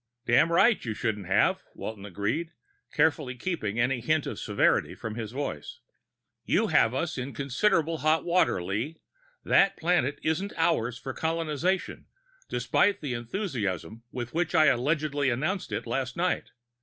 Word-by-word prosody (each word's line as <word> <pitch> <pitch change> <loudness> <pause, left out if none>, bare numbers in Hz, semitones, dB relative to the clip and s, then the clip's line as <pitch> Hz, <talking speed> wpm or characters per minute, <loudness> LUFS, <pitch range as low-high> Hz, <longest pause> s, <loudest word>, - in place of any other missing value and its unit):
"Damned 120 +7 +4
right 200 +7 +4
you 110 -3 -3
shouldn't 105 -4 -2
have," 100 +2 +3
Walton 105 -2 -6
agreed, 110 - -2 0.4
carefully 150 -4 +1
keeping 120 - -2
any 125 +1 +2
hint 155 +5 +1
of - - -5
severity - - +1
from 110 -1 -6
his 110 -1 -5
voice. 120 - -5 0.7
"You - - +1
have 115 +2 +4
us 155 0 -2
in 125 0 -5
considerable 160 - +1
hot 155 +1 +2
water, 175 - +2
Lee. 110 - -3 0.5
That 195 - +4
planet 165 -5 +1
isn't 175 +6 -1
ours 125 -8 +1
for 130 0 -6
colonization, 165 +3 -1 0.4
despite 205 - +2
the 140 -5 -3
enthusiasm 115 - -3
with 120 -1 -5
which 175 +1 0
I 155 -1 +6
allegedly 145 +1 +1
announced 155 - -2
it 105 +2 -3
last 125 +1 -2
night. 180 +1 0
140 Hz, 145 wpm, -28 LUFS, 115-165 Hz, 0.7 s, I